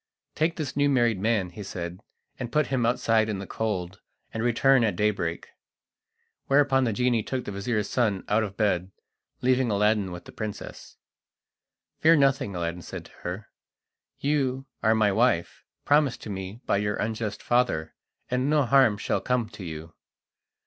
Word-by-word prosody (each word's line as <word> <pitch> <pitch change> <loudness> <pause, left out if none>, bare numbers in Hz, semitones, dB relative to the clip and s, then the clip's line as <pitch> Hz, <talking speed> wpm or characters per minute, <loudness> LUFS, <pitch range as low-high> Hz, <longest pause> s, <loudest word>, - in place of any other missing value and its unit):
"Take 165 +2 0
this 150 -6 -4
new 145 0 +3
married 120 -6 +2
man," 100 -3 +1
he 105 - -9
said, 90 -2 -6 0.4
"and 120 -2 -4
put 150 +1 +2
him 120 -3 +2
outside 115 -2 +2
in 105 - -2
the 95 - -6
cold, 95 -4 -3 0.3
and 110 - -2
return 120 +2 +4
at 105 -5 +1
daybreak." 95 -4 -1 1.0
Whereupon 135 -2 +4
the 115 - +1
genie 120 +1 +1
took 130 +3 -4
the - - -4
vizir's 105 +2 -1
son 110 -6 0
out 105 +2 +2
of 100 -3 -4
bed, 95 -4 +1 0.5
leaving 130 -1 +3
Aladdin 105 -2 +2
with 90 0 -8
the - - -11
princess. 110 -2 -7 1.0
"Fear 165 +1 +6
nothing," 135 - +2
Aladdin 85 0 -3
said - - -8
to - - -16
her; 90 +5 -5 0.7
"you 135 -2 0 0.2
are 110 0 +3
my 105 -2 +3
wife, 95 -5 +1 0.2
promised 145 -3 +2
to 105 - -6
me 95 +4 -6
by - - +2
your 105 0 0
unjust 110 -1 -3
father, 120 -11 +1 0.4
and 125 +2 +1
no 150 -2 +3
harm 130 -4 +4
shall - - -1
come 125 -3 0
to 105 -3 -10
you." 80 -1 -7
110 Hz, 165 wpm, -26 LUFS, 100-130 Hz, 1.0 s, Fear